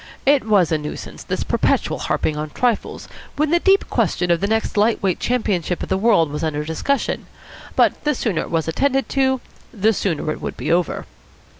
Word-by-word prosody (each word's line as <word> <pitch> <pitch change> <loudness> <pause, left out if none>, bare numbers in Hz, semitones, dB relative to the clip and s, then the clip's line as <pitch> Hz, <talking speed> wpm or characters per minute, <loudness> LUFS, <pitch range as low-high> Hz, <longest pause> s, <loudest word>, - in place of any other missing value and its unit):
It 280 -2 +4
was 200 -7 +3
a 160 - +2
nuisance, 150 0 -7
this - - -2
perpetual - - 0
harping 155 - -1
on 150 0 -4
trifles 240 +7 -1 0.3
when 305 +1 +1
the 345 - +4
deep 390 +2 +3
question 180 -1 0
of 170 - +2
the 220 +3 0
light 215 +1 +2
weight 190 -2 +1
Championship 195 -8 -1
of - - -6
the - - +2
World 190 -7 +3
was 150 +2 -4
under 150 -1 -1
discussion, 160 - -1 0.5
but - - +2
the 300 -1 +1
sooner 195 -9 -1
it - - -6
was 165 -1 -1
attended 270 +10 +1
to, 265 -2 +1 0.3
the 220 +1 +2
sooner 165 -6 -1
it - - -6
would - - -5
be - - -2
over. 175 0 0
200 Hz, 190 wpm, -21 LUFS, 165-250 Hz, 0.5 s, It